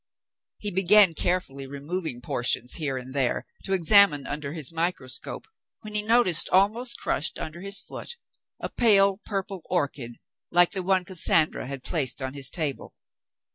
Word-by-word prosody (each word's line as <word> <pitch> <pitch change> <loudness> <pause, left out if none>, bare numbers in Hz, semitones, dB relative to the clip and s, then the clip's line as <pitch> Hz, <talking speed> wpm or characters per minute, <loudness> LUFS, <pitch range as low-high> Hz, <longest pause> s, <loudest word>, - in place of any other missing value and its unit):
He 205 - -4
began 190 0 +5
carefully 150 -6 -2
removing 145 -1 -4
portions 120 0 -1
here 145 -5 -2
and 130 +1 -8
there 135 -3 0 0.2
to 195 - -2
examine 185 -5 +4
under 145 -2 -5
his 155 -4 -2
microscope, 165 -6 -3 0.4
when 215 0 -9
he 210 - +1
noticed, 215 -6 +4
almost 215 +6 +1
crushed 150 - -2
under 160 +2 -7
his 200 +1 -1
foot, 210 - -7 0.4
a - - -5
pale 200 -4 +3
purple 195 -2 -5
orchid 140 -8 -3 0.3
like 175 0 +4
the 190 - -2
one 185 0 +1
Cassandra 165 -6 +2
had 135 -1 -7
placed 140 -8 -1
on 130 -1 -4
his 140 -2 +1
table. 150 -5 -4
170 Hz, 150 wpm, -25 LUFS, 140-195 Hz, 0.4 s, began